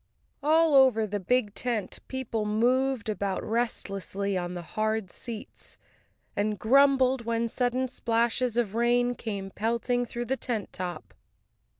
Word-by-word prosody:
All 315 +2 +4
over 260 -5 +6
the 205 0 -3
big 210 +1 +1
tent 230 -4 -2
people 250 -4 -3
moved 245 +3 +1
about 200 -3 -2
restlessly 200 -3 -2
on 180 0 -3
the 175 - -5
hard 215 +1 -2
seats, 230 -3 -8 0.6
and 210 +1 0
grumbled 265 +2 +4
when 230 0 0
sudden 250 +2 0
splashes 235 0 0
of 225 -5 +1
rain 240 +1 +2
came 200 -5 -5
pelting 235 +3 0
through 240 +1 -4
the 265 +3 -1
tent 225 -6 -3
top. 175 -3 -6
230 Hz, 130 wpm, -28 LUFS, 210-250 Hz, 0.6 s, over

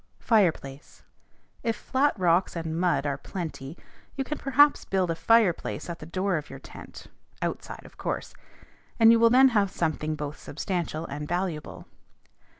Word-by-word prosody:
FIREPLACE. 165 - 0 0.6
If 230 -1 -1
flat 270 +4 0
rocks 180 0 +2
and 165 -1 -4
mud 175 -4 +1
are 140 -1 -2
plenty, 160 -3 -6 0.4
you 270 - -1
can 295 +3 -5
perhaps 285 +2 +4
build 185 -3 0
a - - -2
fireplace 195 -2 +1
at 170 - -8
the 150 - -9
door 185 +1 -1
of 150 - -7
your - - -8
tent - - -12 0.4
(outside, - - -5
of - - -16
course), - - -4 0.7
and 225 0 +8
you 230 - +5
will 230 0 +6
then 260 +3 +6
have 205 -5 +2
something 155 -3 -2
both 150 -1 -6
substantial 165 0 -4
and 150 +1 -6
valuable. 175 -3 -4
175 Hz, 155 wpm, -26 LUFS, 155-225 Hz, 0.7 s, and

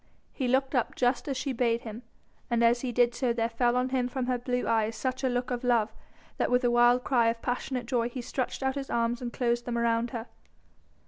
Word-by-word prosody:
He 260 - -2
looked 265 +2 +1
up 250 -4 0
just 245 +3 +1
as 275 -2 -2
she 270 +1 -2
bade 235 -1 +1
him, 225 +1 -8 0.5
and 235 -1 +2
as 235 +1 +4
he 255 - -2
did 240 0 +3
so 245 -1 0
there 230 -1 0
fell 240 +1 +1
on 250 +1 +1
him 255 -1 0
from 255 0 -3
her 250 -1 0
blue 250 0 -2
eyes 225 0 +1
such 260 +3 -3
a 260 - +2
look 245 +1 -2
of 245 0 -2
love, 230 -3 +2 0.4
that - - +1
with 250 +1 +2
a 245 - +3
wild 240 +1 +4
cry 240 -4 +3
of 230 0 -1
passionate 250 0 -2
joy 240 -2 0
he 250 +1 -6
stretched 255 +2 -3
out 265 0 +1
his 275 -1 -5
arms 235 +1 0
and 240 -1 -4
closed 240 -1 0
them 240 -1 -2
around 235 0 +1
her. 230 -2 -5
245 Hz, 240 wpm, -28 LUFS, 235-255 Hz, 0.5 s, as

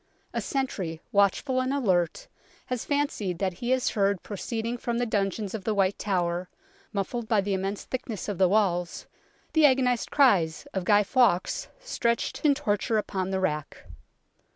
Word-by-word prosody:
A - - -1
sentry, 195 - -2
watchful 205 +6 +2
and 255 +1 -1
alert, 185 - 0 0.4
has 250 -2 -3
fancied 280 - -1
that 190 0 -1
he 240 - -2
has 260 -1 +2
heard 200 -2 +1
proceed 225 +2 -4
ing 240 +1 -2
from 235 0 -2
the 245 - +1
dungeons 205 -2 -1
of 220 -4 -4
the 215 +2 0
White 195 -1 +1
Tower, 180 -2 -1 0.4
muffled 220 +3 -3
by 215 -2 +3
the 200 0 0
immense 195 +1 -2
thickness 235 -6 -5
of 205 -4 -3
the 185 -2 +5
walls, 180 -4 +1 0.5
the 315 -2 +7
agonized 255 -3 +1
cries 195 - +3
of 190 -2 -2
Guy 205 +1 +5
Fawkes, 235 - +2
stretched 235 - -1
in 290 -2 +5
torture 225 -4 0
upon 190 -3 -2
the 190 0 -1
rack. 150 -6 -3
205 Hz, 165 wpm, -27 LUFS, 190-245 Hz, 0.5 s, the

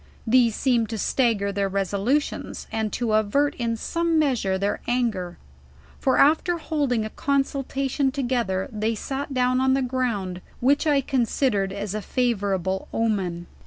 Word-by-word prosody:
These 235 -1 +4
seemed 240 -5 +1
to 225 - -3
stagger 215 -4 +1
their 200 0 -1
resolutions, 200 +9 -1
and 220 -1 -1
to 235 -3 -1
avert 220 +7 +2
in 230 -1 -1
some 335 +6 0
measure 250 -11 +1
their 200 +2 -1
anger; 220 -8 -1 0.6
for 265 - +2
after 320 +4 +4
holding 285 -9 -1
a 215 - -6
consultation 275 0 0
together, 240 -8 -1
they 215 +1 -1
eat 275 +6 -4
down 255 0 +2
on 265 0 +3
the 270 - +1
ground, 230 -8 -2 0.2
which 280 +5 +2
Iconsiderad 255 -7 +1
as 200 0 -4
a 215 - -3
favorable 195 -6 -1
omen. 190 -6 -1
235 Hz, 140 wpm, -24 LUFS, 200-270 Hz, 0.6 s, These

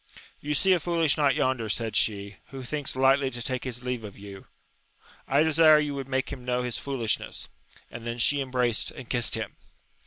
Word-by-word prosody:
You 150 0 -2
see 190 +5 +4
a 180 - +2
foolish 165 -3 +2
knight 145 -4 +2
yonder, 130 -4 0
said 110 0 -1
she, 100 -2 +1
who 135 -1 -8
thinks 145 +2 -3
lightly 135 +1 +3
to 120 -2 -8
take 130 0 -3
his 125 -1 -4
leave 125 -2 -3
of 100 -2 -9
you: 100 -1 -11 0.8
I 140 +3 +3
desire 160 0 +6
you 150 -1 0
would 135 -1 -6
make 130 0 -1
him 130 -3 -9
know 125 0 -1
his 125 -2 -3
fool 135 -4 -4
ishness! 110 - -2 0.4
and 120 0 -8
then 120 0 -3
she 140 +4 +3
embraced 125 -3 0
and 130 - -10
kissed 120 -1 0
him. - - -5
130 Hz, 205 wpm, -27 LUFS, 120-140 Hz, 0.8 s, desire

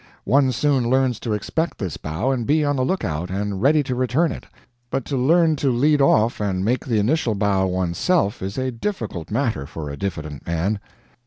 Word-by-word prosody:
One 135 -1 +3
soon 130 -1 +1
learns 130 -2 +2
to 115 - -2
expect 160 - -2
this 95 -8 -4
bow 80 - -2
and 120 -4 -2
be 150 +1 +3
on 145 0 +1
the 130 - 0
lookout 90 - -2
and 100 0 -3
ready 145 +4 +4
to 130 - -3
return 130 +6 +1
it; - - -8 0.4
but 135 0 -2
to 140 - -3
learn 160 +5 +3
to 140 - +1
lead 145 +4 +3
off 115 -4 +3
and 95 -2 -1
make 120 +2 +1
the 115 -4 0
initial 115 +1 +1
bow 100 -2 +1
one's 90 -2 -2
self 170 - +1
is 95 +1 -4
a 130 0 -1
difficult 115 - -4
matter 70 +1 -1
for 75 -2 -6
a 70 - -7
diffident 75 -7 -5
man. 85 +5 0
120 Hz, 200 wpm, -22 LUFS, 95-135 Hz, 0.4 s, ready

